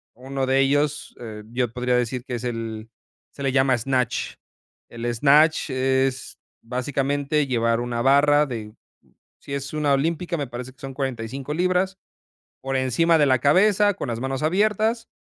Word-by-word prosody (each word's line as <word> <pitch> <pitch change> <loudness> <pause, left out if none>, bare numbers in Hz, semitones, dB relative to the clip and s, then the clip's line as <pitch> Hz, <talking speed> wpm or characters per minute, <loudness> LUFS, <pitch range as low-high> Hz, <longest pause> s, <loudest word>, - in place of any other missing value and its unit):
Uno 135 +2 -3
de 130 +1 +2
ellos, 145 +2 0
eh, 110 -3 -8
yo 120 0 -1
podría 125 0 0
decir 125 0 -2
que 125 - -4
es 120 - -6
el 115 -2 -5 0.4
se 140 - -9
le 135 - +1
llama 130 -1 +3
snatch. 125 0 -1 0.6
El 115 0 -7
snatch 150 +6 +4
es 130 0 0 0.3
básicamente, 140 +4 -1
llevar 115 -2 +1
una 120 -1 -2
barra 145 +3 +4
de 110 -6 -6 0.7
si 140 - -8
es 140 +1 -4
una 150 -2 0
olímpica, 165 +5 -1
me 145 -3 -3
parece 120 +1 -7
que 135 - -34
son 135 -1 -7
45 130 +1 -4
libras, 185 +3 0 0.6
por 135 0 -3
encima 160 +6 +2
de 150 - +4
la 130 -2 +3
cabeza, 205 - +4
con - - -5
las 115 -1 -3
manos 135 +1 -3
abiertas, 215 +6 +1
135 Hz, 160 wpm, -23 LUFS, 125-150 Hz, 0.7 s, snatch